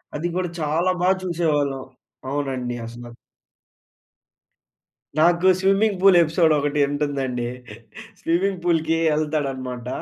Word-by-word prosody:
అది 165 +4 -2
కూడా 180 -2 -1
చాలా 165 +5 +1
బాగా 190 +1 +4
చూసేవాళ్ళం. 150 -6 -1 0.5
అవునండి 130 -4 -3
అసల. 120 0 -10 2.0
నాకు 170 +3 +4
స్విమ్మింగ్ 195 +1 +2
పూల్ 195 -2 +6
ఎపిసోడ్ 160 0 +3
ఒకటి 145 +1 -1
ఉంటుందండి. 135 -4 -2 0.7
స్విమ్మింగ్ 180 +2 0
పూల్‌కి 165 -2 +1
వెళ్తాడనమాట. 135 -5 -2
155 Hz, 95 wpm, -22 LUFS, 135-175 Hz, 2.0 s, పూల్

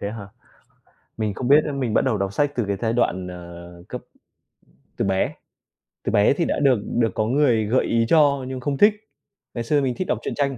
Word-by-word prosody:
Thế 100 - -3
hả? 105 -3 -8 0.9
Mình 110 -2 -2
không 125 +4 -3
biết 150 +2 +6
nữa 150 - -3
mình 130 -6 -2
bắt - - +3
đầu 130 -5 +1
đọc 100 0 -2
sách 145 +5 0
từ 120 - 0
cái 100 - 0
giai 110 - +1
đoạn, 95 -6 0
ờ, 85 0 -10
cấp 125 - -6 1.0
từ - - 0
bé. 95 -1 0 0.7
Từ - - -2
bé 105 +5 +4
thì 165 +4 -1
đã - - -1
được 135 -5 +3
được 115 -3 0
có 110 - 0
người 120 -3 +2
gợi 120 +5 +1
ý 115 0 +1
cho 145 -4 +4
nhưng 130 0 -5
không 140 +2 -2
thích. 205 +8 +6 0.6
Ngày 120 - -3
xưa 145 +5 +1
mình 130 -3 -1
thích 185 - -3
đọc - - 0
truyện - - -4
tranh. 140 -2 -1
120 Hz, 225 wpm, -22 LUFS, 100-140 Hz, 1.0 s, biết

